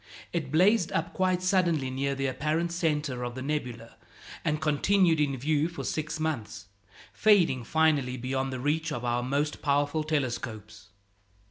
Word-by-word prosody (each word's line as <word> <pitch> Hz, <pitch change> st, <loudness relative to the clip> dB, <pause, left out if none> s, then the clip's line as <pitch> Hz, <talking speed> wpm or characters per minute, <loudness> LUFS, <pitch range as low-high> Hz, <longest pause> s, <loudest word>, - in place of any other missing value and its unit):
It 155 Hz, -6 st, -2 dB
blazed 185 Hz, +3 st, +3 dB
up 165 Hz, +1 st, -1 dB
quite 185 Hz, -1 st, +1 dB
suddenly 170 Hz, -8 st, +1 dB
near 140 Hz, +1 st, -1 dB
the 135 Hz, 0 st, -2 dB
apparent 155 Hz, +6 st, -1 dB
centre 150 Hz, -7 st, -1 dB
of 120 Hz, 0 st, -4 dB
the 130 Hz, -, -5 dB
nebula, 125 Hz, -6 st, -4 dB, 0.5 s
and 150 Hz, 0 st, 0 dB
continued 160 Hz, +3 st, +2 dB
in 140 Hz, -3 st, +1 dB
view 150 Hz, +4 st, +1 dB
for 170 Hz, -, -7 dB
six 155 Hz, 0 st, -3 dB
months, 115 Hz, -10 st, -3 dB, 0.5 s
fading 180 Hz, -, +3 dB
finally 145 Hz, -3 st, +1 dB
beyond 130 Hz, +2 st, -2 dB
the 130 Hz, -, -4 dB
reach 155 Hz, +4 st, -1 dB
of 120 Hz, -3 st, -4 dB
our 120 Hz, 0 st, 0 dB
most 140 Hz, +4 st, -1 dB
powerful 145 Hz, +2 st, +1 dB
telescopes. 120 Hz, -8 st, -3 dB
150 Hz, 150 wpm, -28 LUFS, 130-160 Hz, 0.5 s, blazed